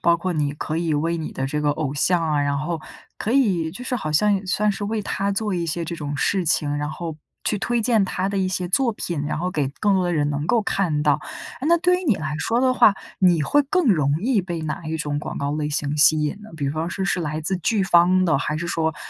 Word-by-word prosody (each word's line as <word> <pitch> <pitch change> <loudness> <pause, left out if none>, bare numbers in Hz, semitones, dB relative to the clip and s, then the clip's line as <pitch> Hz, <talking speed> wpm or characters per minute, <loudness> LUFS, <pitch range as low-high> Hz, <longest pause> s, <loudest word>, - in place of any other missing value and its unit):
包 170 0 +4
括 180 +2 -2
你 145 -3 0
可 155 +1 -4
以 165 -2 0
为 165 +3 0
你 160 -2 -5
的 135 - -2
这 150 +2 -2
个 145 0 +2
偶 145 -2 -2
像 175 +4 +2
啊， 150 -3 +1
然 140 0 0
后 160 +2 -3 0.4
可 215 - -2
以 195 -12 +2
就 250 +8 -9
是 255 - -2
好 155 -11 -3
像 205 +7 +3
也 195 - -2
算 210 +3 +1
是 205 +1 -5
为 215 +1 -1
他 200 -1 -2
做 205 0 -1
一 170 -1 -1
些 165 +1 -2
这 170 - -4
种 145 -3 -4
事 185 +6 +1
情， 150 -2 +1
然 150 +1 -2
后 165 -1 -6 0.3
去 210 - 0
推 240 +3 0
荐 220 -4 +3
他 190 +1 -2
的 200 - -3
一 190 - +1
些 180 -1 -2
作 235 +4 +2
品， 170 -7 -3
然 155 - -2
后 180 +2 -1
给 145 -6 -1
更 205 -2 +3
多 185 -1 +2
的 175 - 0
人 145 -2 +1
能 145 +1 -2
够 230 +3 +2
看 170 -8 0
到。 150 -1 +3 0.5
那 340 +2 +5
对 360 +1 +2
于 370 - -7
你 240 - +3
来 155 -3 -4
说 230 +9 0
的 260 -1 +3
话， 235 -5 +5 0.2
你 175 -5 +4
会 290 - +3
更 330 +4 0
容 150 -7 +3
易 235 -3 +2
被 175 -2 -5
哪 155 +3 -4
一 160 +1 -2
种 145 -2 -2
广 - - -6
告 140 0 -1
类 150 -1 -1
型 150 0 -2
吸 155 +1 +5
引 150 +5 -1
呢？ 215 - -12
比 140 -2 -1
方 160 +3 -2
是 190 +2 -3
是 195 - 0
来 155 -1 -3
自 190 +4 -1
剧 195 +4 0
方 185 0 +4
的， 160 -6 +2
还 150 +1 -2
是 170 +2 -4
说 160 -2 0
170 Hz, 285 characters per minute, -22 LUFS, 150-200 Hz, 0.5 s, 那